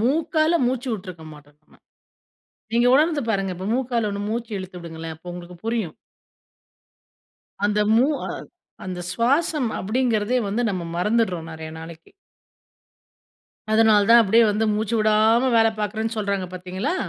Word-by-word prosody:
மூக்கால 310 +4 +2
மூச்சுவுட்டுருக்க 220 -10 -4
மாட்டோம் 145 0 -18
நம்ம. - - -24 1.0
நீங்க 235 +1 +3
உணர்ந்து 305 +2 +3
பாருங்க 195 -3 -1
இப்ப 185 - -6
மூக்கால 240 -4 -1
ஒண்ணு 200 0 -4
மூச்சு 235 +1 -4
இழுத்து 185 -1 -8
விடுங்களேன் 165 -1 -7
அப்போ 175 +2 -10
உங்களுக்கு 175 0 -9
புரியும். 225 -8 -2 1.7
அந்த 210 0 +2
மூ 245 +4 +5 0.2
அ - - -5 0.6
அந்த 180 -1 -5
சுவாசம் 275 - +1
அப்படிங்கிறதே 235 +1 0
வந்து 220 +5 -1
நம்ம 185 -3 -3
மறந்துடுறோம் 185 -4 0
நிறைய 160 0 -8
நாளைக்கு. 165 0 -11 1.6
அதனால் 220 -2 +4
தான் 235 0 +9
அப்படியே 225 +3 +4
வந்து 210 +2 0
மூச்சு 215 +1 -1
விடாம 220 +3 +3
வேலை 225 0 +5
பார்க்குறேன்னு 220 +2 -2
சொல்றாங்க 200 -3 -1
பார்த்தீங்களா! 185 - -3
215 Hz, 130 wpm, -23 LUFS, 185-235 Hz, 1.7 s, தான்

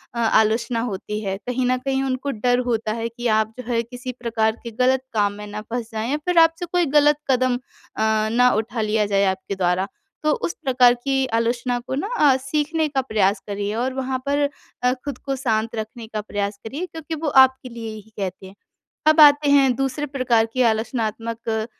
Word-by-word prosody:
अ, - - -3
आलोचना 230 +1 +2
होती 210 +2 -4
है। 195 -1 -2
कहीं 250 0 0
न 255 0 +2
कहीं 270 0 0
उनको 265 +1 -2
डर 245 +1 +1
होता 225 -2 0
है 230 0 -3
कि 240 +1 -4
आप 220 +1 -1
जो - - -5
है, 230 -1 +2
किसी 250 +2 -7
प्रकार 220 -2 0
के 235 - -6
गलत 260 +1 +3
काम 205 -2 +1
में 210 0 -9
ना 210 +1 -6
फँस 240 -1 -3
जाएँ 220 +3 -3
या 295 - +1
फिर 360 -1 0
आपसे 330 +2 +3
कोई 350 0 +1
गलत 295 0 +5
कदम 255 -1 +2
अ, 220 -3 -2
ना 250 +2 +5
उठा 225 +1 -2
लिया 215 0 +1
जाए 200 -1 +2
आपके 190 +1 -2
द्वारा। 185 +1 0 0.4
तो 305 - +3
उस - - -2
प्रकार 250 -2 +5
की 270 -1 +1
आलोचना 245 +1 -1
को 265 - -2
ना 290 +9 -2
अ, 285 -8 +5
सीखने 300 +4 -1
का 275 -2 0
प्रयास 210 -5 +1
करिए 205 0 -3
और 250 +3 -1
वहाँ 260 0 -2
पर 285 0 +1 0.3
अ, 250 0 +3
खुद 285 -4 -4
को 275 +1 -4
शांत 230 -3 -1
रखने 220 +1 -6
का 215 -1 -4
प्रयास 205 -1 -3
करिए, 285 +10 -4
क्योंकि 320 -2 -7
वो 315 0 -4 0.2
आपके 260 0 -8
लिए 230 -2 -7
ही 215 +1 -13
कहते 190 -1 -4
हैं। 190 - -14 0.5
अब 310 +1 +5
आते 290 0 +7
हैं 275 -2 +5
दूसरे 270 +3 -2
प्रकार 255 -5 +1
के 255 - +2
आलोचनात्मक 225 0 -2
240 Hz, 205 wpm, -22 LUFS, 220-270 Hz, 0.5 s, आते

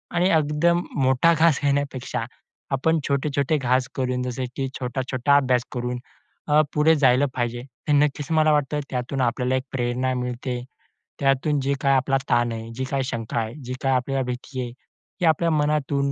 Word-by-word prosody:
आणि 180 +2 +3
एकदम 155 +3 +2 0.2
मोठा 130 +5 +4
घास 160 -3 +3
घेण्यापेक्षा 140 -2 -1 0.5
आपण 160 +4 +2
छोटे-छोटे 140 +1 +1
घास 130 -1 +1
करून, 125 -1 -1
जसे 125 0 -3
की 135 - -1
छोटा-छोटा 130 +2 0
अभ्यास 125 -3 +2
करून 125 0 -3 0.5
अ, 150 +1 +5
पुढे 155 +2 +4
जायला 135 -2 +4
पाहिजे. 120 -1 -1 0.3
हे - - +4
नक्कीच 145 -1 +2
मला 155 -1 +4
वाटतं, 150 0 +1
त्यातून 125 +2 -2
आपल्याला 125 +1 +1
एक 130 - -1
प्रेरणा 125 0 -1
मिळते. 125 0 -3 0.6
त्यातून 140 +2 +2
जे 140 +1 0
काही 135 -1 +3
आपला 135 +1 +2
ताण 120 -1 +2
आहे, 115 0 -6
जी 130 - -3
काही 135 -1 0
शंका 115 -3 -4
आहे, 110 0 -3
जी 125 +1 -5
काय 135 - +2
आपल्याला 135 +1 0
भीती 125 +1 -5
आहे, 120 - -4 0.5
हे - - +3
आपल्या 165 +1 +3
मनातून 145 -2 +1
135 Hz, 170 wpm, -24 LUFS, 125-145 Hz, 0.6 s, अ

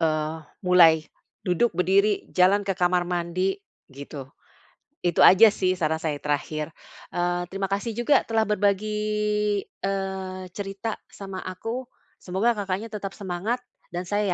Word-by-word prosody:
eee, 155 0 0 0.2
mulai. 165 -3 +6 0.4
Duduk, 185 +6 +1
berdiri, 195 +3 +3
jalan 195 +3 +4
ke 195 - 0
kamar 180 -1 +2
mandi, 175 +2 -1 0.4
gitu. 140 0 -8 0.8
Itu 175 -1 +3
aja 195 +4 +9
sih, 185 -2 0
saran 160 -1 +1
saya 150 -2 -1
yang - - -22
terakhir. 150 +1 -1 0.5
Eee, 175 0 0
terima 195 +1 -4
kasih 210 +3 -2
juga 240 +5 +3
telah 225 -1 +2
berbagi, 210 0 +1 0.6
eee, 190 -1 -4
cerita 200 +3 -5
sama 195 -2 -8
aku. 225 +7 -4 0.3
Semoga 195 +6 +1
Kakaknya 200 +3 -3
tetap 200 -2 -5
semangat. 200 +6 -3 0.3
Dan 175 - -2
saya 205 0 0
190 Hz, 135 wpm, -25 LUFS, 175-205 Hz, 0.8 s, aja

